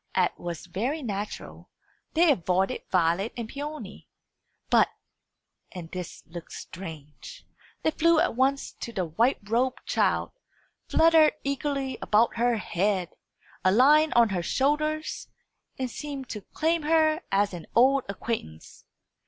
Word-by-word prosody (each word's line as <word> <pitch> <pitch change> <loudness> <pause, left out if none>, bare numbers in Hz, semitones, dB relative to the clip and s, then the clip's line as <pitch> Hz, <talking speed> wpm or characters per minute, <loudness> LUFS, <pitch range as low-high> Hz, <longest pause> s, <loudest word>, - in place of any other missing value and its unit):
As 185 -2 +3
was 170 -2 -6
very 240 - -3
natural, 205 -2 -6 0.5
they 335 0 +5
avoided 185 - 0
Violet 180 +4 +1
and 235 -2 -4
Peony. 295 +4 -7 0.6
But - - +5 0.8
and 175 -4 -8
this 180 -2 -7
looked 170 0 -10
strange 160 -5 -10 0.4
they 315 - +2
flew 335 +1 +3
at 340 -7 +1
once 270 +2 +1
to 235 - -5
the 190 -5 -2
white 225 - +2
robed 245 +4 0
child, - - +1 0.6
fluttered 320 -1 +5
eagerly 275 -1 -2
about 225 +3 +2
her 240 0 +2
head, 190 -2 -1 0.5
alighted 280 +11 +5
on 235 -2 +6
her 185 -3 -1
shoulders, 305 - -1 0.5
and 260 - -2
seemed 280 -2 -6
to 210 - -5
claim 330 +1 +1
her 315 +1 +3
as 200 0 +2
an 170 -2 -8
old 265 +3 +5
acquaintance. 200 - -6
235 Hz, 130 wpm, -27 LUFS, 185-295 Hz, 0.8 s, on